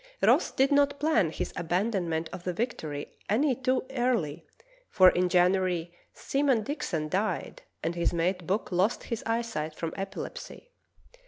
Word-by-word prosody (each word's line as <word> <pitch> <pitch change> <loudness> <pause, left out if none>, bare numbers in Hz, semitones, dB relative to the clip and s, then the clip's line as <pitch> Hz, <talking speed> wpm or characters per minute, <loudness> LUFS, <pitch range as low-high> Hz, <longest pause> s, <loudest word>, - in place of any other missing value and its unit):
Ross - - +5
did 270 +2 +2
not 285 0 +3
plan 280 - +3
his - - -4
abandonment 175 -2 -1
of 185 -1 -7
the 180 - -2
Victory 160 - -4
any 260 +7 +3
too 255 +1 0
early, 240 - 0 0.5
for 185 -2 +7
in 180 0 +1
January 180 -1 +2 0.2
Seaman 270 -5 +1
Dixon 175 - -3
died 195 +7 -2 0.2
and 165 - 0
his 170 0 0
mate 175 0 -1
Buck 195 +2 -1
lost 190 +6 +1
his 230 - -4
eyesight 225 -10 -2
from 165 0 -4
epilepsy. 195 - -7
190 Hz, 145 wpm, -28 LUFS, 170-245 Hz, 0.5 s, for